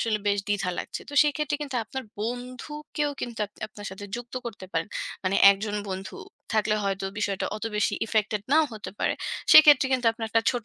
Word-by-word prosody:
আসলে 220 -2 +1
বেশ 200 0 +2
দ্বিধা 200 -3 0
লাগছে - - -5
তো 290 - -7
সেক্ষেত্রে 300 0 0
কিন্তু 275 -3 -4
আপনার 265 +5 -5 0.2
বন্ধুকেও 255 +6 -4
কিন্তু 235 -2 -5
আপ - - -29 0.2
আপনার 205 -1 -10
সাথে 190 +2 -8
যুক্ত 240 0 -9
করতে 205 -5 -7
পারেন। 165 +4 -1 0.4
মানে 185 +1 +2
একজন 205 +1 -1
বন্ধু 190 0 -5 0.4
থাকলে 215 -1 +2
হয়তো 195 0 -1
বিষয়টা 200 -2 -1
অত 215 - -6
বেশি 210 0 +1
effected 215 -1 0
নাও 315 +1 +6
হতে 215 -1 -7
পারে। - - +1 0.4
সেক্ষেত্রে 295 -3 +9
কিন্তু 255 -2 +1
আপনার 225 -1 -5
একটা 225 0 +3
ছোট 245 -3 -4
220 Hz, 185 wpm, -26 LUFS, 205-260 Hz, 0.4 s, সেক্ষেত্রে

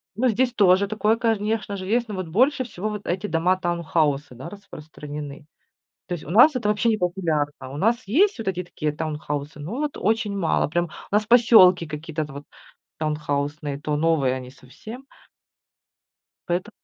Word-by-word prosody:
ну, 255 +4 +1
здесь 245 +3 +1
тоже 195 -1 +4
такое, 215 +1 +1
конечно 220 -2 -1
же, 185 - -6
есть. 235 +2 +1
Но 210 - -5
вот 185 -3 -4
больше 255 - +2
всего 215 -2 -5
вот 210 -1 -6
эти 190 +4 -2
дома-таунхаусы, 165 -6 0
да, 130 - -8
распространены. 150 -6 -9 0.6
То 180 - -3
есть 155 - -10
у - - -9
нас 245 - +6
это 230 -4 -1
вообще 210 +2 +2
не 220 - +2
популярно. 170 -5 -1 0.2
У 140 - -7
нас 230 +7 +1
есть 380 - +3
вот 225 - -6
эти 180 -1 -3
такие 155 -3 -3
таунхаусы, 150 -1 -5
но 180 - -5
вот 300 -1 -3
очень 215 -1 0
мало. 165 -5 +1
Прям. 175 +3 0 0.3
У - - +1
нас 215 0 +2
поселки 215 -7 +6
какие-то 155 0 -4
т 140 - -12
вот 140 +1 -8 0.6
таунхаусные, 145 -1 -2
то 150 0 -1
новые 150 -5 +2
они 130 -1 -7
совсем. 215 - -12 1.4
Поэто 175 +1 -1
180 Hz, 170 wpm, -23 LUFS, 150-215 Hz, 1.4 s, нас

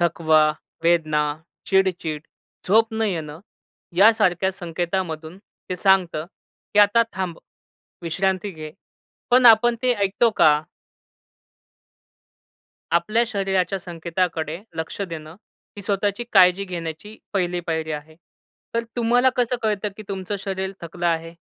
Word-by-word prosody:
थकवा, 160 -2 +3 0.4
वेदना, 155 -3 +3 0.4
चिडचिड, 180 -6 0 0.4
झोप 225 +4 +4
न 220 - -1
येणं 160 -7 -3 0.6
यासारख्या 195 -3 +4
संकेतामधून 175 -1 -4
ते 185 -2 -9
सांगतं, 180 -4 +2 0.5
की 210 - +3
आता 205 +3 +5
थांब. 185 -3 -4 0.6
विश्रांती 190 +4 -1
घे, 155 -3 -8 0.6
पण 250 0 +6
आपण 235 +1 +7
ते 255 -1 +3
ऐकतो 205 +3 +2
का? 150 -1 +5 2.3
आपल्या 215 +7 +2
शरीराच्या 195 -3 -1
संकेताकडे 170 -2 -3 0.2
लक्ष 160 +4 -5
देणं 155 -1 -8 0.4
ही 205 - -8
स्वतःची 200 +3 -1
काळजी 185 0 +5
घेण्याची 175 +3 -7 0.2
पहिली 180 -3 0
पायरी 160 -1 -2
आहे. 155 +1 -8 0.6
तर 230 0 0
तुम्हाला 245 +2 +3
कसं 245 0 +1
कळतं, 210 -1 0
की 215 - -8
तुमचं 195 0 -4
शरीर 190 -1 -3
थकलं 170 +1 -4
आहे? 165 0 -1
185 Hz, 115 wpm, -22 LUFS, 165-205 Hz, 2.3 s, आपण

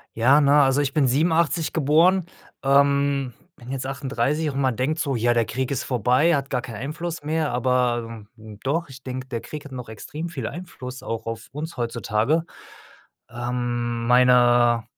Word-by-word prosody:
Ja, 130 +6 +5
na, 145 0 +5
also 135 +2 +2
ich 140 -1 -2
bin 145 -4 +3
1987 160 +4 +1
geboren, 165 +5 +3 0.4
ähm, 140 -1 +2 0.2
bin 120 +1 -10
jetzt 135 -1 -3
38 140 +3 -1
und 135 - -4
man 130 -3 +1
denkt 145 +6 -1
so: 140 -5 -1
„Ja, 120 +1 +2
der 115 -1 +2
Krieg 125 +4 -3
ist 140 - -2
vorbei, 125 - +2
hat 140 -1 -3
gar 125 - -1
keinen 115 -4 -7
Einfluss 155 +6 -5
mehr.“ 155 0 -1
Aber 120 -3 0
doch, 120 +10 -4
ich 135 -1 -12
denke, 130 0 -6
der 120 -3 -4
Krieg 150 -1 -8
hat 145 - -11
noch 125 -2 -7
extrem 150 +9 -7
viel 135 -9 -5
Einfluss 130 -8 -8
auch 115 0 -5
auf 115 0 -5
uns 155 +4 -6
heutzutage. 120 +5 0 0.9
Ähm, 120 -1 -3
meine 120 -1 +5
130 Hz, 170 wpm, -23 LUFS, 120-150 Hz, 0.9 s, Ja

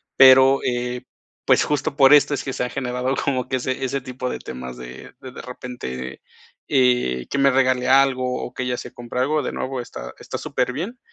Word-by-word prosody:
Pero, 135 +1 +7
eh, 125 0 -2 0.4
pues, - - +4
justo 150 0 -1
por 135 -1 +7
esto 145 0 +5
es - - -5
que 135 - -4
se - - -2
ha 125 - -2
generado 125 0 -2
como 130 -2 -1
que 130 - 0
ese 130 +1 -3
ese 135 +1 -2
tipo 125 0 -5
de - - -4
temas 65 0 -8
de 60 +1 -10
de 130 -1 -9
repente, 65 - -7 0.5
eh, 125 - +2
que 140 - 0
me 140 0 +5
regale 130 -1 +2
algo, 130 -1 +3
o 125 - -7
que - - -5
ella 125 -1 -2
se - - -8
compre 120 +1 -6
algo, 150 +4 +1
de - - -3
nuevo 130 -1 -4
está - - -9
está - - -6
súperbien, 170 - -3
130 Hz, 200 wpm, -22 LUFS, 125-135 Hz, 0.5 s, Pero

